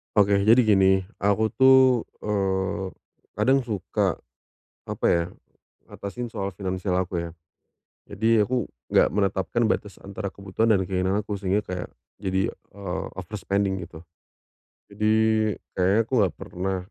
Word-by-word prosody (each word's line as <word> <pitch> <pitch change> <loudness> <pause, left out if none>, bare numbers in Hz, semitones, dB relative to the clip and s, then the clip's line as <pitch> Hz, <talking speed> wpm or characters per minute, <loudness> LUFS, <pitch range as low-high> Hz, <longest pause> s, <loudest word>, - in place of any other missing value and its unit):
Oke 100 -1 +4
jadi 115 +4 +6
gini, 95 -2 +5 0.2
aku 100 +2 +3
tuh, 130 -2 +6 0.2
eee, 95 -2 -1 0.4
kadang 135 0 +2
suka, 105 -6 -1 0.7
apa - - -2
ya, 85 0 +2 0.7
ngatasin 115 +4 -6
soal 100 -3 -4
finansial 95 -1 -2
aku 90 -1 -1
ya. 85 0 -4 0.8
Jadi 110 +2 +2
aku 120 +1 0 0.2
enggak - - +4
menetapkan 100 +3 0
batas 105 -3 -3
antara 100 0 -6
kebutuhan 100 +3 0
dan 95 - +2
keinginan 95 +2 0
aku 105 -1 -4
sehingga 100 +1 0
kayak 90 -3 -6 0.3
jadi, 95 -1 0
eee, 95 -2 -7
over 95 +3 -7
spending 95 -2 -1
gitu. 80 -1 -12 0.9
Jadi 105 +1 +1 0.7
kayaknya 95 +3 +3
aku 115 - -16
enggak 95 -7 +2
pernah, 95 +2 -4
100 Hz, 130 wpm, -25 LUFS, 95-110 Hz, 0.9 s, jadi